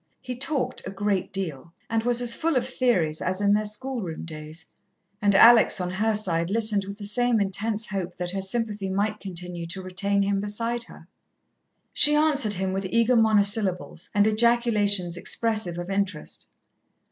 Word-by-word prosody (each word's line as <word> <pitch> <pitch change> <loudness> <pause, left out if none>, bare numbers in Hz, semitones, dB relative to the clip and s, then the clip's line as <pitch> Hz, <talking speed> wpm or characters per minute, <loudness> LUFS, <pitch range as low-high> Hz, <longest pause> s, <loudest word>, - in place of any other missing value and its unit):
He 250 -1 -7
talked 260 -2 -2
a - - -6
great 195 -1 -2
deal, 165 -5 -5
and 225 0 -1
was 245 +1 +1
as 235 -1 +3
full 325 +3 -1
of 250 -1 0
theories 205 -13 0
as 185 +1 -2
in 205 0 +2
their 215 +1 +1
schoolroom 215 -5 -4
days, 155 0 -9 0.6
and 200 -1 +2
Alex, 230 0 +6
on 180 -1 -3
her 215 +3 0
side, 170 -5 -1
listened 215 -2 +1
with 200 +1 -8
the 205 - -7
same 240 +2 +1
intense 210 +3 -1
hope 185 -3 -5
that 175 0 -3
her 195 0 -3
sympathy 205 -1 -2
might 210 +2 -1
continue 175 -2 -6
to 190 +3 -5
retain 200 +2 0
him 200 0 0
beside 230 +4 -3
her. - - -15 0.9
She 295 0 +6
answered 290 -8 +2
him 190 0 -2
with 195 0 -3
eager 230 +3 +2
monosyllables 205 -5 +2
and 205 0 +4
ejaculations 215 -5 +2
expressive 215 -3 -1
of 175 +2 -6
interest. 195 -5 -3
205 Hz, 170 wpm, -24 LUFS, 185-230 Hz, 0.9 s, Alex